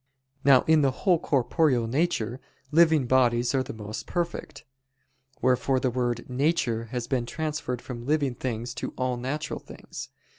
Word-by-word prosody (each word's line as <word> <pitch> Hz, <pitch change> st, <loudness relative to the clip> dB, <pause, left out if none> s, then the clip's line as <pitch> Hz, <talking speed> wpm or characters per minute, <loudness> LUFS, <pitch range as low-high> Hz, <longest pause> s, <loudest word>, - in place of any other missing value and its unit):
Now 135 Hz, -2 st, +6 dB
in 160 Hz, -1 st, +4 dB
the 140 Hz, -, +4 dB, 0.2 s
whole 180 Hz, -4 st, +5 dB
corporeal 135 Hz, -2 st, +2 dB
nature, 125 Hz, -3 st, 0 dB, 0.3 s
living 160 Hz, -3 st, +5 dB
bodies 120 Hz, -1 st, +3 dB
are 135 Hz, -, +2 dB
the 130 Hz, -, -5 dB
most 110 Hz, -1 st, -7 dB
perfect: 175 Hz, -1 st, -3 dB, 0.8 s
wherefore 130 Hz, +1 st, +2 dB
the 130 Hz, -1 st, 0 dB
word 120 Hz, -1 st, -1 dB
"nature" 130 Hz, -4 st, 0 dB
has 120 Hz, +1 st, -4 dB
been 120 Hz, -1 st, -1 dB
transferred 150 Hz, -5 st, -3 dB
from 120 Hz, -1 st, -7 dB
living 145 Hz, -3 st, +1 dB
things 120 Hz, -1 st, -4 dB
to -, -, -4 dB
all 130 Hz, -1 st, 0 dB
natural 130 Hz, +5 st, -3 dB
things. -, -, -9 dB
130 Hz, 150 wpm, -27 LUFS, 120-150 Hz, 0.8 s, Now